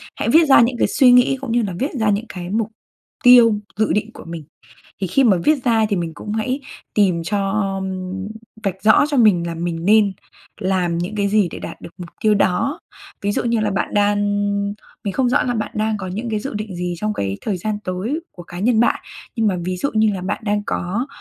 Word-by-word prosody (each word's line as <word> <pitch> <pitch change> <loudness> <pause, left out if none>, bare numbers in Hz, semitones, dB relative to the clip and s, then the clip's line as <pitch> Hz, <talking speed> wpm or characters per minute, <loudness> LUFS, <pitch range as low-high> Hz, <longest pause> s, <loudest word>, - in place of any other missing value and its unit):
Hãy - - -2
viết 325 +1 +6
ra 270 - +8
những 240 +1 +1
cái - - +2
suy 255 -2 +5
nghĩ 250 +2 +5
cũng 270 -4 -4
như 240 +1 +2
là 200 -5 -3
viết 275 - -1
ra 220 - +2
những 205 +2 0
cái 180 -1 -7
mục 215 +1 -1 0.5
tiêu 240 -3 +7 0.2
dự 215 0 +1
định 210 +2 -1
của - - -11
mình. 165 -2 -7 0.6
Thì 190 - 0
khi 270 +10 +2
mà 205 -7 +4
viết 300 -4 +3
ra 225 -2 +3
thì 205 - +1
mình 170 -3 -3
cũng 210 +7 -7
hãy 250 +5 -1 0.3
tìm 185 -5 +2
cho 195 +2 -1 0.9
vạch 190 -1 -3
rõ 220 +6 +6
cho 290 - 0
mình 195 -8 +4
là 170 - -4
mình 165 0 -3
nên 205 -1 +4 0.5
làm 185 -3 0
những 180 +5 -3
cái 200 -1 +1
gì 205 -2 +3
để - - -7
đạt - - -8
được - - -9
mục 175 -2 -8
tiêu 215 -1 +3
đó. 200 +9 +1 0.4
Ví 205 0 0
dụ - - -1
như 235 -1 +1
là 215 -1 0
bạn 195 - -2
đang 205 0 +2 0.9
mình 200 - -3
không 255 +2 +1
rõ 270 +4 +2
là 245 - -1
bạn 215 - -3
đang 215 0 0
có 190 -2 -6
những 215 +6 -4
cái 215 -1 -1
dự 270 +6 -5
định 210 -3 -5
gì 180 0 -3
trong 210 +4 -2
cái 100 - -3
thời 205 -4 -2
gian 210 +4 -3
tới 190 - -2
của 175 - -11
cá 175 +1 -9
nhân 220 +3 +2
bạn, 235 - +2 0.3
nhưng 225 -3 +1
mà 190 -3 0
ví 185 0 -2
dụ 280 - -1
như 215 -1 +3
là 190 - -5
bạn 190 +5 -3
đang 205 0 +1
có 205 +10 -2
210 Hz, 240 wpm, -20 LUFS, 185-230 Hz, 0.9 s, ra